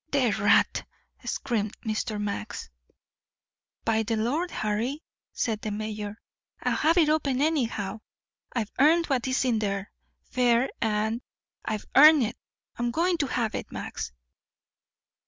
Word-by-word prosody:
"The 260 -5 +3
rat!" 205 0 +3 0.4
screamed 220 -6 -2
Mr. 215 -1 -2
Max. 205 - -4 1.1
"By 225 -1 +2
the 225 +1 -1
Lord 275 +11 0
Harry," 230 +8 -2 0.3
said 220 -2 -1
the 215 - -3
mayor, 210 0 -4 0.4
"I'll - - +1
have 325 +3 +3
it 325 -3 +5
open, 295 -4 +1
anyhow. 235 -9 0 0.5
I've 225 -4 -2
earned 325 +4 +5
what's 260 -2 0
in 235 -4 +2
there, 200 -1 -2 0.3
fair 245 0 +2
and 220 +2 0 0.4
I've 215 -1 -3
earned 300 0 +9
it. 225 +1 -2 0.4
I'm 240 0 0
going 340 +7 +1
to 285 - +1
have 235 -4 -1
it, - - -5
Max." - - -5
235 Hz, 130 wpm, -27 LUFS, 215-275 Hz, 1.1 s, earned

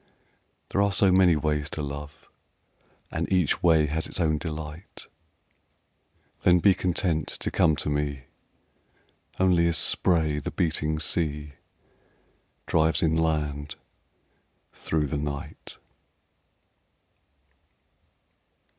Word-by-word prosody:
There 100 - +1
are 100 0 +2
so 95 0 +4
many 90 -2 +5
ways 75 -1 -1
to 75 - -5
love 70 +1 -8 0.8
And - - -3
each 90 -5 +1
way 80 -3 +4
has 80 +2 -3
its - - -5
own 80 -3 +1
delight 80 +2 -8 1.4
Then 90 -1 +5
be 95 +3 +4
content 90 -3 -1
to - - -1
come 80 -2 +3
to - - -4
me 75 -2 -2 1.2
Only 90 -2 +3
as 85 -2 +2
spray 80 -3 +3
the 70 - -5
beating 80 -2 -1
sea 75 -2 -1 1.1
Drives 80 -1 +1
inland 75 -3 -1 1.0
through 80 -2 -2
the 70 +1 -3
night. 70 -1 -7
80 Hz, 100 wpm, -26 LUFS, 75-85 Hz, 1.4 s, many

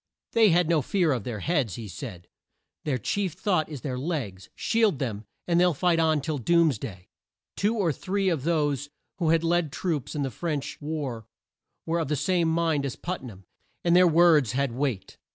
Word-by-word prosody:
"They 225 -2 +5
have 175 0 +4
no 165 -2 +3
fear 175 +3 +1
of 120 -7 -2
their 110 -5 -4
heads," 145 - 0
he 115 -2 -7
said, 95 -4 -8 0.6
"their 140 -4 0
chief 185 - -1
thought 180 -3 0
is 145 -5 -7
their 130 -3 -3
legs. 130 - -4
Shield 225 -8 +2
them, 110 -5 -4 0.2
and 170 -1 +3
they'll 180 -2 +3
fight 170 +3 +2
on 160 -2 +2
till 150 0 -3
doom's 160 -3 +3
day." 95 -8 -8 0.5
Two 210 +3 +1
or 185 -8 +1
three 195 +5 -1
of 165 -7 +1
those 145 -3 0 0.3
who 165 -3 +1
had 165 0 +3
led 170 -2 +1
troops 155 -7 -3
in 145 - -1
the 135 - -2
French 150 -4 -4
war, 140 -7 -4 0.6
were 165 +1 0
of 165 - -1
the 150 - 0
same 175 +3 +1
mind 160 -3 +1
as 135 -3 -3
Put 180 +1 -4
nam, 100 -7 -11 0.4
and 170 0 +3
their 180 0 +7
words 160 -7 +5
had 140 0 0
weight. 125 -5 -3
155 Hz, 195 wpm, -26 LUFS, 130-170 Hz, 0.6 s, their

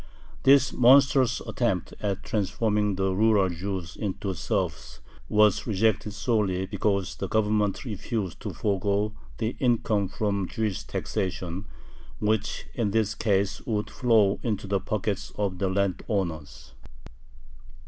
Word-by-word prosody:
This 135 -1 +5
monstrous 130 0 +5
attempt 110 -8 -1
at 100 -2 -2
transforming 105 0 0
the 95 0 0
rural 105 -1 +3
Jews 90 0 -4
into 100 -1 -3
serfs 85 - -3 0.3
was 105 -2 +3
rejected 105 0 +1
solely 105 -4 0
because 100 -1 -1
the 95 - -3
Government 105 +1 +1
refused 105 -3 -4
to - - -5
forego 100 +1 0 0.2
the 110 +1 -2
income 110 -5 +1
from 100 -2 -1
Jewish 110 -2 -2
taxation, 90 0 -3 0.5
which 105 0 -1
in 115 -4 0
this 105 0 +1
case 100 -2 0
would 105 -3 -1
flow 110 -5 +3
into 105 -4 -2
the 100 0 0
pockets 100 0 -3
of 95 -3 -1
the 95 -1 +1
landowners. 95 -5 -2
100 Hz, 120 wpm, -26 LUFS, 95-110 Hz, 0.5 s, This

